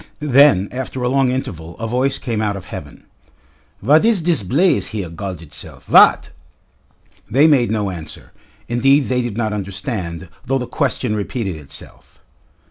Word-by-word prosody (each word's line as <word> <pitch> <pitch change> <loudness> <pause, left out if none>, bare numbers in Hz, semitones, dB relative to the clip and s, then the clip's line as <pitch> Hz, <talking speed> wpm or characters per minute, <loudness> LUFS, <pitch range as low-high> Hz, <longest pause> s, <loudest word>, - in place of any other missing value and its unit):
Then 140 -9 +4
after 130 0 -5
a 125 - +1
long 135 0 +2
interval 85 -11 -5
a 115 - -4
voice 130 +4 0
came 115 -4 -3
out 105 -2 -1
of 95 -2 -8
heaven. - - -9 0.8
"Vat 150 - +5
id 220 -6 +2
diss 165 -6 +2
blace 150 - +2
here 100 -7 -5
galled 90 0 -6
itself; 80 - -9
vat?" - - +5 1.0
They 135 +7 +4
made 140 -6 +4
no 105 -3 -1
answer. 80 -4 -9 0.4
Indeed 135 +5 +3
they 125 -1 +1
did 120 -3 -4
not 110 -2 -1
understand, 95 -3 -5 0.2
though 135 +1 0
the 125 - -3
question 130 -4 -1
repeated 105 -2 -3
itself. 75 -3 -10
120 Hz, 155 wpm, -19 LUFS, 95-135 Hz, 1.0 s, Vat